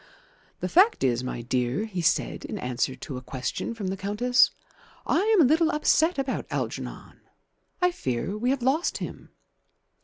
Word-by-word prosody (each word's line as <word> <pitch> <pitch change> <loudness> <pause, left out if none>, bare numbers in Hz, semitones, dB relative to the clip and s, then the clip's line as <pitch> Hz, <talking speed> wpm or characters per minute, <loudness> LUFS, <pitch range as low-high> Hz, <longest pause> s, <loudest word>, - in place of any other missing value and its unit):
"The - - -1
fact 405 +6 +4
is, 125 -1 +1
my 120 -2 -4
dear," 125 - -1
he 190 -5 -4
said, 165 - 0
in - - -5
answer 125 +1 -2
to 130 +1 -7
a - - -6
question 130 - -4
from 200 -4 -3
the 190 - -2
Countess, 215 +6 +3 0.6
"I - - +2
am 425 -1 +4
a - - +6
little 320 +4 +3
upset 315 +2 +2
about 270 -1 -2
Algernon. - - -5 0.6
I 360 - +5
fear 130 - -3
we 240 +4 -1
have 265 -2 0
lost 280 +7 +1
him." - - -7
220 Hz, 165 wpm, -26 LUFS, -, 0.6 s, a